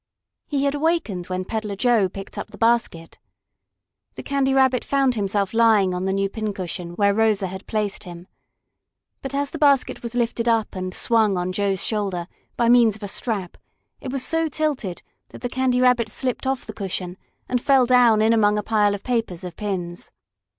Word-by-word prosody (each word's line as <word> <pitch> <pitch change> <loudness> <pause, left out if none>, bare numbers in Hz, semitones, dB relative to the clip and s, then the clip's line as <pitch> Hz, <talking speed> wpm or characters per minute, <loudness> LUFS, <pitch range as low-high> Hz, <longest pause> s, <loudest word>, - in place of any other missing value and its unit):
He 280 -2 -1
had 280 0 +1
awakened 290 - -1
when 185 0 -3
Peddler 215 -1 -3
Joe 225 -3 +2
picked 195 +1 -9
up - - -6
the - - -13
basket. 225 -8 0 1.0
The - - -8
Candy 275 -1 0
Rabbit 265 -2 +3
found 275 -2 +2
himself 200 -2 -1
lying 220 -5 +4
on 180 +1 -3
the 190 - 0
new 195 0 0
pin 215 +1 -4
cushion, 175 -1 -5
where 200 +1 +3
Rosa 215 -2 +2
had 190 +1 -7
placed 210 -3 -2
him. 175 -1 -10 1.0
But 270 0 -5
as 280 0 -1
the 320 - -6
basket 280 -3 +3
was 235 0 -7
lifted 235 -1 -1
up 225 -3 +1
and 185 0 -4
swung 215 -1 +2
on 180 +1 -2
Joe's 195 -1 0
shoulder 195 -5 -1 0.3
by 235 - +2
means 235 -3 +5
of 215 - -11
a - - -3
strap, 200 -3 -4 0.4
it 255 - -6
was 270 -1 -2
so 325 0 +1
tilted 290 - -2 0.3
that - - -12
the 245 - -3
Candy 255 0 +1
Rabbit 245 -3 +3
slipped 255 +3 -3
off 265 -1 -1
the - - -8
cushion 185 -2 -4 0.3
and 250 -1 0
fell 270 -2 +4
down 240 -3 +5
in 225 +1 +4
among 210 -2 +3
a 210 - -1
pile 210 -2 +2
of 200 - -10
papers 225 -9 -2
of 180 -2 -7
pins. 180 -4 -4
220 Hz, 190 wpm, -22 LUFS, 195-250 Hz, 1.0 s, means